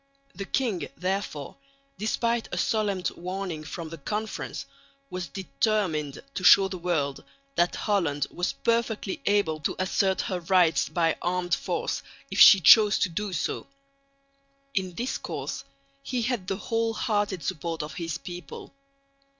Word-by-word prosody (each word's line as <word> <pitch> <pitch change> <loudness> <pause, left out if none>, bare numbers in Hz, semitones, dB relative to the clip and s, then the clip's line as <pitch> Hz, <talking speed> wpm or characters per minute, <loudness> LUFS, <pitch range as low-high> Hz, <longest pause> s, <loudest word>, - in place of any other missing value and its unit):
The 195 - -6
king, 200 - -1
therefore, 185 -5 -3 0.4
despite 230 +2 0
a - - -3
solemn 205 -4 0
warning 180 -3 -4
from 160 +1 -6
the 165 0 -8
Conference, 215 +9 -4 0.5
was 180 -1 -4
determined 190 - -1
to 185 - -4
show 195 +2 +8
the 185 -1 -6
world 155 -6 -1 0.3
that 175 -6 +2
Holland 165 -9 0
was 180 - -1
perfectly 230 -4 -1
able 200 -7 +2
to 150 - -2
assert 190 0 +1
her 185 -2 -2
rights 175 -1 +3
by 165 -3 +1
armed 175 0 -1
force - - -1 0.3
if - - -2
she 195 - +10
chose 210 +3 +7
to 185 - +1
do 200 +4 -3
so. 165 - -2 1.1
In 185 -3 -2
this 245 +7 -2
course - - -5 0.4
he 250 -3 -2
had 230 -6 -2
the 195 - -1
whole 225 +1 -1
hearted 205 -6 -1
support 165 -3 -3
of 150 -1 -7
his 165 0 -3
people. 175 - -9
185 Hz, 140 wpm, -27 LUFS, 165-210 Hz, 1.1 s, she